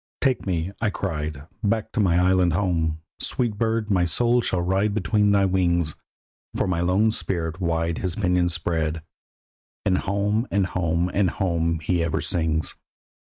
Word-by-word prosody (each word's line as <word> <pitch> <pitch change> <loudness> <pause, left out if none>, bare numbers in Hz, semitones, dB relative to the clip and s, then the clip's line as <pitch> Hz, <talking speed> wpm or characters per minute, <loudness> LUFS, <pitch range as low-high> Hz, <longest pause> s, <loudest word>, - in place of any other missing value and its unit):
Take 130 -6 0
me, 85 0 -1
I 115 - +2
cried, 75 -8 -4 0.2
back 110 +1 0
to 120 - -2
my 90 -5 +3
island 90 -1 +3
home; 85 -4 0 0.2
Sweet 115 -5 -1
bird, 110 -2 0
my 90 -3 +3
soul 120 +8 +2
shall 90 -6 -1
ride 95 +3 +1
between 105 0 +2
thy 100 -1 +4
wings; 85 -4 +1 0.6
For - - +1
my 90 -3 0
lone 95 +5 +3
spirit 85 -4 -3
wide 85 -1 0
his 95 -3 -2
pinions 90 -4 +1
spread, 80 -2 -2 0.8
And 95 -2 +2
home 105 +4 0
and 100 -1 +1
home 90 -1 0
and 100 -2 +2
home 85 -3 -1
he 85 +2 0
ever 85 - -1
sings. 80 -3 0
90 Hz, 155 wpm, -24 LUFS, 85-100 Hz, 0.8 s, thy